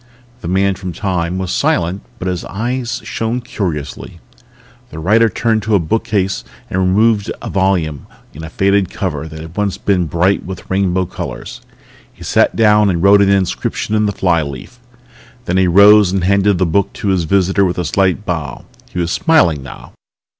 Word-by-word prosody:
The 110 - -7
Man 95 +2 +1
from 95 -1 -7
Time 90 -3 -2
was 95 -1 -3
silent 90 +3 0 0.2
but 90 - -5
his 90 -2 -2
eyes 120 +5 -3
shone 115 +2 -2
curiously. 85 - -5 0.7
The - - -10
writer 110 +8 +3
turned 115 0 0
to 105 0 0
a - - +4
bookcase 100 +2 -1 0.3
and 95 - -1
removed 105 +3 +2
a - - -7
volume 90 -7 0 0.3
in 80 - -9
a 80 - -7
faded 100 +1 +1
cover 80 -5 -4
that 80 0 -9
had 80 +2 -10
once 105 -2 -1
been 90 -4 0
bright 90 +6 +1
with 95 -1 -8
rainbow 95 -1 +1
colors. - - -7 0.5
He - - -14
sat - - +2
down 105 -2 +4
and 85 -2 -1
wrote 100 +1 +6
an 100 - +3
inscription 100 +2 -1
on 105 -1 +2
the - - 0
flyleaf. 85 - -2 0.7
Then 90 - 0
he 95 -1 +3
rose 100 +2 +6
and 95 -2 -1
handed 100 +1 +2
the 95 - +1
book 95 +4 0
to 100 - -3
his 90 -3 +1
visitor 95 +2 +2
with 90 -2 0
a 90 - -2
slight 95 +4 0
bow. 80 -8 -4 0.2
He - - -9
was 85 -1 -1
smiling 120 - +2
now. 70 - -11
95 Hz, 180 wpm, -16 LUFS, 85-100 Hz, 0.7 s, wrote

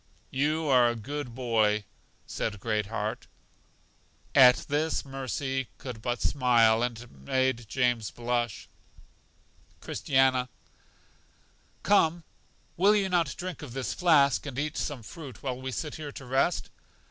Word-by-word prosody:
You 155 +4 0
are 125 -3 +5
a 120 - -2
good 130 +2 -6
boy, 110 -4 +1 0.4
said 110 -2 -4
Great 105 -1 -1
heart. 110 0 -4 1.1
At 125 -3 +7
this 155 +2 0
Mercy 135 -1 -3
could 125 -5 -8
but 120 +1 -2
smile, 115 -4 +4
and 120 -2 -2
it 120 0 -12
made 120 - -1
James 120 -5 +1
blush. 120 +2 -2 1.1
Christiana: 130 -2 +1 1.3
Come, 170 -4 +3 0.5
will 200 +4 +5
you 195 -2 +1
not 170 -5 +1
drink 180 -1 -6
of 140 -6 -8
this 135 -1 -3
flask, 145 -6 +3
and 130 -3 -6
eat 150 +2 -2
some 140 -6 -3
fruit, 135 -1 -10
while 130 -2 -3
we 130 0 -4
sit 150 +3 -4
here 150 -2 -6
to 135 - -9
rest? 135 +7 0
130 Hz, 135 wpm, -28 LUFS, 120-145 Hz, 1.3 s, At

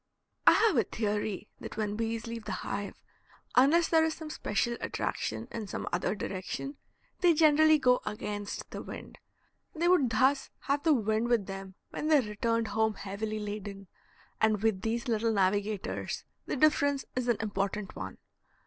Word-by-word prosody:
I - - +10
have 430 - +4
a 230 - +5
theory 210 0 -2
that - - -8
when 210 -1 -1
bees 225 +1 -2
leave 230 -1 -6
the 210 - -4
hive, 200 0 -3 0.6
unless 305 +7 +5
there 320 -1 +4
is 320 0 0
some 315 -1 -7
special 235 -2 -1
attraction - - -2
in 220 -3 -5
some - - -5
other 180 +3 0
direction, 205 +8 -4 0.4
they 350 -3 +5
generally 310 0 +6
go 250 -3 +3
against 205 -1 -5
the - - -5
wind. - - -9 0.6
They 335 +2 +1
would 350 -9 +4
thus 260 +5 +2
have 280 +1 0
the 320 -1 +4
wind 220 0 +1
with 235 -5 +2
them 195 -1 -7 0.2
when 305 - -3
they 310 -2 +6
returned 230 0 0
home 220 +1 +1
heavily 210 +3 -4
laden, 205 -1 -6 0.6
and 215 -1 +3
with 215 -4 +2
these 235 +3 -2
little 225 -1 +1
navigators 200 +1 0 0.2
the - - -1
difference 285 -1 +3
is 255 -1 -1
an 240 -3 +3
important 200 -1 -2
one. 95 0 -6
220 Hz, 165 wpm, -30 LUFS, 205-275 Hz, 0.6 s, I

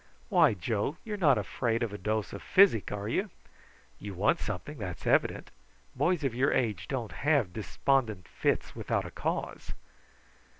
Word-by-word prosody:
Why, - - +5
Joe, 110 - -2
you're 215 -2 -4
not 150 -10 +4
afraid 115 -1 -1
of 110 -3 -3
a - - -4
dose 105 +2 -2
of 100 - -6
physic, 190 - +4
are 105 0 -4
you? 195 - -1 0.7
You 100 -2 -7
want 100 +4 +2
something, 105 +9 -5
that's 90 -4 -6
evident. - - +1 0.4
Boys 175 -3 +1
of 135 -4 0
your 130 +4 +2
age 110 -7 0
don't 120 -5 -3
have 140 - +1
despondent 110 - 0
fits - - -1
without - - -1
a - - -7
cause." - - -4
115 Hz, 160 wpm, -30 LUFS, 105-140 Hz, 0.7 s, Why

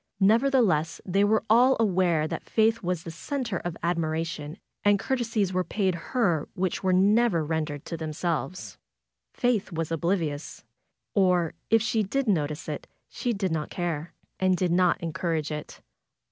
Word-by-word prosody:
Nevertheless 215 - +3
they 195 +2 +2
were 215 +2 +3
all 245 +4 +5
aware 180 -7 +2
that - - -6
Faith 220 0 +2
was 180 -2 -2
the 165 - -6
center 235 - -3
of 175 -1 -5
admiration, 160 -2 -2 0.3
and 205 0 +5
courtesies 225 -5 -1
were 185 0 +1
paid 190 -1 0
her 170 - 0
which 185 -1 -1
were 190 - +2
never 195 -2 +3
rendered 155 -2 -3
to 165 - -5
themselves. 160 0 -3 0.5
Faith 245 -6 0
was 165 -1 -3
oblivious. 165 -3 -2 0.5
Or 180 -4 +2 0.2
if 225 -1 +4
she 225 -1 +1
did 255 +6 -1
notice 150 -5 0
it - - -5 0.2
she 245 - -2
did 195 -5 -1
not 155 -2 -2
care, 170 -2 -3 0.2
and 185 -1 +3
did 180 -1 0
not 180 0 +3
encourage 165 -2 -2
it. 150 -1 -7
180 Hz, 150 wpm, -27 LUFS, 160-210 Hz, 0.5 s, all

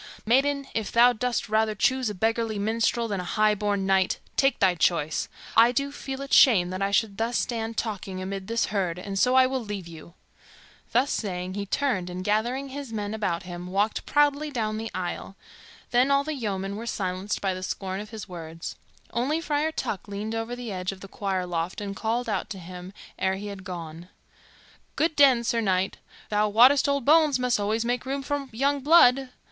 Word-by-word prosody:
Maiden, 275 +4 +2
if 220 -2 -2
thou 245 +1 +6
dost 245 +1 -2
rather 215 0 +1
choose 260 +3 +1
a 210 - -5
beggarly 225 +2 0
minstrel 230 +3 0
than 200 -3 -2
a - - -3
high 215 +3 +2
born 205 -1 -1
knight, 190 -1 +2 0.2
take 270 0 +3
thy 190 -2 +4
choice. 160 -3 0 0.3
I 230 +2 +7
do 280 +3 -1
feel 270 -1 -6
it 275 - -6
shame 185 -9 +6
that 185 +1 -4
I 195 - +1
should 200 0 0
thus 230 +2 0
stand 225 -2 -2
talking 195 -4 -3
amid 190 0 -5
this 230 +1 +1
herd, 180 -4 0
and 195 +1 -4
so 250 +4 +3
I 260 0 +7
will 260 -1 -2
leave 205 -4 -6
you." 170 +1 -12 0.8
Thus 255 +4 +2
saying, 185 -3 -3
he 200 0 -4
turned 205 -8 0
and, 180 +1 -5
gathering 240 +7 0
his 275 -2 -7
men 210 -1 -3
about 195 -6 -2
him, 175 0 -7
walked 200 +4 -1
proudly 295 +1 +2
down 215 -5 -2
the 225 0 -4
aisle. 185 +2 -4 0.6
Then 250 +3 +4
all 280 0 +3
the 310 +2 -3
yeomen 200 -6 -3
were 230 +2 -6
silenced 190 -1 -2
by 195 -2 0
the 185 - -6
scorn 190 0 -4
of 210 +1 -7
his 220 -2 -8
words. 165 -2 -7 0.4
Only 265 +7 0
Friar 310 -1 0
Tuck 205 - -4
leaned 205 +2 -4
over 225 +2 -3
the 245 -3 -6
edge 185 0 -3
of 195 -1 -11
the 195 - -9
choir 190 -2 -2
loft 170 0 -3
and 200 -1 -5
called 230 +4 -1
out 210 -1 -2
to 195 - -6
him 180 +1 -9 0.3
ere 190 0 +1
he 205 +2 -6
had 190 -1 -10
gone, 170 -1 -8 0.9
"Good 320 0 +1
den, 265 -5 +6
Sir 230 0 0
Knight. 190 -2 0 0.3
Thou 210 0 +2
wottest 255 +7 +6
old 280 -3 0
bones 305 -2 +5
must 250 -3 +1
alway 210 +2 0
make 245 +2 -2
room 275 +1 -2
for 285 0 -3
young 280 +5 +1
blood." 270 -3 +5
215 Hz, 200 wpm, -26 LUFS, 190-250 Hz, 0.9 s, I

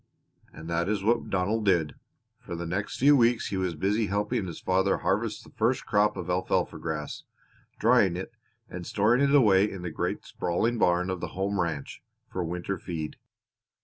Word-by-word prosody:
And 80 - -10
that 85 +1 0
was 100 -1 -1
what 115 +2 +1
Donald 100 +4 0
did. 85 -7 +2 0.5
For 85 - -7
the 85 +1 -4
next 95 +5 -3
few 145 +3 +6
weeks 120 -2 +3
he 95 - -2
was 90 -3 -1
busy 100 +6 0
helping 105 +1 -1
his 85 - -7
father 95 +1 +1
harvest 105 +2 -1
the - - -16
first 115 +4 0
crop 105 0 +2
of 90 -2 -5
alfalfa 90 +1 0
grass, 75 -2 -4 0.6
drying 110 -6 +4
it, 95 +5 -5 0.4
and 90 -3 -7
storing 110 +5 +2
it 140 0 +4
away 105 -6 +5
in 95 -3 -7
the 85 - -4
great - - -3
sprawling 115 +7 -1
barn 90 0 +2
of 95 - -3
the - - -6
home 100 +1 -1
ranch 80 -5 -4 0.3
for 90 - -2
winter 90 +3 -3
feed. 80 -4 -5
95 Hz, 180 wpm, -27 LUFS, 85-110 Hz, 0.6 s, few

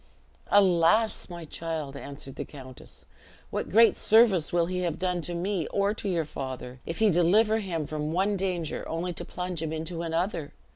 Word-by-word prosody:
"Alas, 200 +3 +3
my 170 -2 -7
child!" 155 -3 -4
answered 140 -1 -8
the - - -4
countess, 130 -3 -12 0.5
"what - - -3
great 225 +3 +6
service 215 -7 +4
will 170 -1 +2
he 180 +1 -3
have 175 -3 -1
done 180 -1 -1
to 175 +1 -4
me 180 -1 -1
or 200 +1 +1
to 210 -2 -4
your 170 -4 0
father, 130 -3 -6
if 165 - -4
he 220 -2 +4
deliver 210 +6 +4
him 170 -7 -3
from 150 +1 -3
one 195 +4 +1
danger, 180 -4 -2
only 175 +2 -2
to - - -5
plunge 180 -2 -5
him 160 -1 -3
into 160 +2 -4
another? 165 -1 -2
170 Hz, 180 wpm, -27 LUFS, 160-195 Hz, 0.5 s, great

